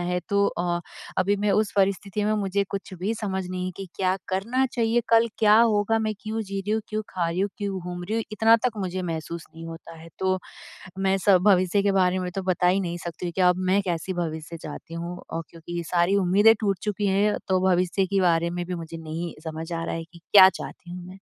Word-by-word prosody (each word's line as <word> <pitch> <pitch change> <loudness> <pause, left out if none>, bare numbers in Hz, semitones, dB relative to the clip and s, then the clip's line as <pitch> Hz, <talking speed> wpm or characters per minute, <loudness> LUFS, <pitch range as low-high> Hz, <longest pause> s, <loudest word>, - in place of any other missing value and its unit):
है 180 0 -1
तो 200 0 +3
अ, 175 0 -1 0.4
अभी 200 +2 +2
मैं 205 +1 0
उस 215 +1 +2
परिस्थिति 200 +1 +1
में 215 - +2
मुझे 200 0 0
कुछ 200 -1 -5
भी 210 +5 -1
समझ 190 -4 -3
नहीं 185 0 -3
कि 195 -1 -6
क्या 185 0 +1
करना 230 +8 0
चाहिए? 235 -1 +1
कल 230 0 +5
क्या 215 -1 +6
होगा? 225 -1 +3
मैं 215 -1 -1
क्यों 220 +1 -3
जी 195 -1 -4
रही 205 +2 -5
हूँ, 220 0 0
क्यों 215 0 -2
खा 170 -2 -1
रही 180 +3 -2
हूँ, 200 - 0
क्यों 200 -2 -3
घूम 175 0 -6
रही 215 +4 -3
हूँ? 225 - 0
इतना 225 +1 +5
तक 225 -3 -3
मुझे 185 -2 -3
महसूस 165 0 -5
नहीं 165 0 -9
होता 165 0 -9
है 165 +1 -12
तो, 185 0 +1 0.6
मैं 195 0 +2
स 190 -2 +8
भविष्य 190 0 +4
के 200 - +3
बारे 185 -1 +2
में 180 -1 -3
तो 195 - -1
बता 180 -1 +1
ही 190 +2 +3
नहीं 175 -2 -3
सकती 170 +1 -5
हूँ 175 - -2
कि 190 - +1
अब 180 -1 +5
मैं 200 +2 +4
कैसी 180 0 -3
भविष्य 165 -1 -4
चाहती 160 +1 -9
हूँ 170 +1 -5
और 165 0 -4
क्योंकि 170 +1 -8
ये 170 - -2
सारी 175 +3 +3
उम्मीदें 200 +4 +5
टूट 200 -4 0
चुकी 205 -1 -1
हैं 205 +2 +2
तो 185 -1 +2
भविष्य 180 +2 +2
के 195 0 0
बारे 170 -1 +3
में 175 0 -3
भी 180 - -4
मुझे 165 -1 -7
नहीं 165 +1 -5
समझ 160 +2 -5
आ 165 0 -2
रहा - - -3
है 165 - -4
कि 170 +1 -16
क्या 190 -2 +10
चाहती 175 -1 -9
हूँ 180 0 -7
मैं? 190 +1 -11
185 Hz, 240 wpm, -25 LUFS, 175-200 Hz, 0.6 s, क्या